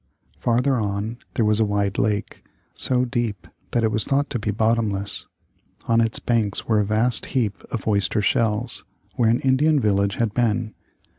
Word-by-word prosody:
Farther 125 +3 +1
on 105 +2 -3 0.2
there 115 - +2
was 105 0 +2
a - - +4
wide 100 -1 0
lake, 105 0 -1 0.3
so 125 -1 +2
deep 120 -7 -3 0.2
that 120 - 0
it 110 - +2
was 110 -1 +3
thought 140 +1 0
to 120 - -1
be 105 - -3
bottomless. 105 -2 0 0.6
On 115 0 +4
its 115 -1 0
banks 110 -4 0
were 110 -2 +3
a - - +3
vast 110 +4 +1
heap 110 -6 0
of 110 -4 -5
oyster 105 +1 +1
shells, 110 +3 0 0.3
where 115 -2 +2
an 120 +2 +2
Indian 145 +3 +3
village 100 -3 +1
had 115 -3 -1
been. 115 -2 0
110 Hz, 170 wpm, -23 LUFS, 105-120 Hz, 0.6 s, a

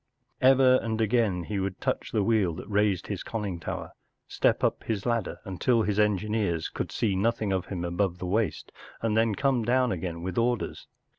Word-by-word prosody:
Ever 130 0 +6
and 110 -1 -2
again 110 -5 +1
he 100 +3 -3
would 95 -1 -3
touch - - -2
the 105 - +1
wheel 100 -6 +2
that 90 - -8
raised 105 -3 +1
his - - -4
conning 100 -6 -4
lower, - - -4 0.4
step - - +1
u - - +5
p - - -23
his 105 -3 -2
ladder 115 -5 -1
until 110 +5 +1
h - - -1
i - - +3
s 105 - -1
engineers 105 -4 +1
could - - -4
see 105 -5 0
nothing 110 0 0
of 95 -1 -2
him 90 -3 -4
above 90 +1 -1
the 90 - -5
waist, 105 +4 -1 0.3
and 110 -2 +1
then 110 -1 +2
come 135 -2 +1
down 125 +1 +2
again 85 -2 -4
with 95 +3 -2
orders. 120 0 -1
105 Hz, 205 wpm, -27 LUFS, 95-115 Hz, 0.4 s, Ever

